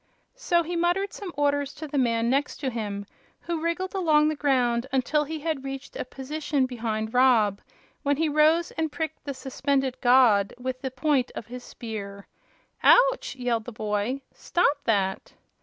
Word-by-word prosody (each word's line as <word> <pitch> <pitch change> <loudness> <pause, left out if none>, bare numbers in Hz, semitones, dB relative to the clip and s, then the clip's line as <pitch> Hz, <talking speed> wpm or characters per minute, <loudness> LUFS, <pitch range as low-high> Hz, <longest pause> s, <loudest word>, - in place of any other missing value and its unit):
So 345 -9 +1
he 345 +2 -4
muttered 350 +4 0
some 390 -3 -7
orders 285 -1 0
to 315 - -7
the 285 -1 -1
man 230 -2 +1
next 275 +4 0
him, 215 -6 -3 0.4
who 335 -2 -3
wriggled 335 +3 -2
along 310 -5 +3
the 310 - -1
ground 250 -4 +1
until 280 +3 +1
he 315 +1 -5
had 310 -4 -2
reached 270 0 -7
a - - -3
position 280 +1 -2
behind 225 -3 -3
Rob, 235 -6 +4 0.4
when 285 -1 +1
he 320 +1 +1
rose 310 +3 +3
and 320 -2 -2
pricked 315 0 -5
the 280 -2 -4
suspended 265 0 -1
"god" 245 -6 +4
with 255 +1 -4
the 265 - -2
point 260 0 0
of - - -6
his 245 +2 -9
spear. 200 -5 -7 0.6
"Ouch!" - - +4
yelled 240 -3 -1
the 245 - -6
boy; 215 +4 -2
"stop 300 -5 +1
that!" 195 -4 0
270 Hz, 165 wpm, -26 LUFS, 240-310 Hz, 0.6 s, Rob